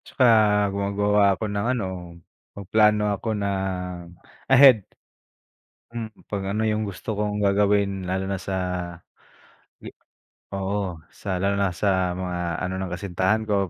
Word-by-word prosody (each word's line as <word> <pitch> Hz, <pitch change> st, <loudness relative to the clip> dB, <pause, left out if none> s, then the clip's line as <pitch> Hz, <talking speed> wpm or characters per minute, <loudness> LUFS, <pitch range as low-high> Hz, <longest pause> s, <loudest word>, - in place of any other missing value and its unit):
Tsaka 130 Hz, -, -1 dB, 0.5 s
gumagawa 100 Hz, +1 st, +1 dB, 0.2 s
ako -, -, -6 dB
ng 100 Hz, +1 st, -1 dB
ano, 105 Hz, -, -2 dB, 0.7 s
mag-plano 105 Hz, +2 st, +3 dB
ako 105 Hz, +3 st, -4 dB
na 100 Hz, -, -1 dB, 1.0 s
ahead. 135 Hz, -4 st, +8 dB, 1.1 s
Hmm, 115 Hz, -1 st, -5 dB, 0.2 s
'pag 100 Hz, -2 st, -3 dB
ano 105 Hz, +2 st, -1 dB
yung 110 Hz, 0 st, 0 dB
gusto 100 Hz, +2 st, -5 dB
kong 105 Hz, 0 st, -1 dB
gagawin 100 Hz, -1 st, +2 dB
lalo 95 Hz, +1 st, -1 dB
na 100 Hz, -, -1 dB
sa 95 Hz, 0 st, -4 dB, 1.9 s
oo, 95 Hz, -2 st, -3 dB, 0.2 s
sa 95 Hz, -2 st, -4 dB
lalo 100 Hz, +2 st, +1 dB
na 100 Hz, -1 st, +2 dB
sa 90 Hz, 0 st, 0 dB
mga 90 Hz, -2 st, -3 dB
ano 90 Hz, -, -3 dB
ng 95 Hz, -, -3 dB
kasintahan 95 Hz, +4 st, 0 dB
ko. 100 Hz, -3 st, 0 dB
100 Hz, 125 wpm, -24 LUFS, 95-105 Hz, 1.9 s, ahead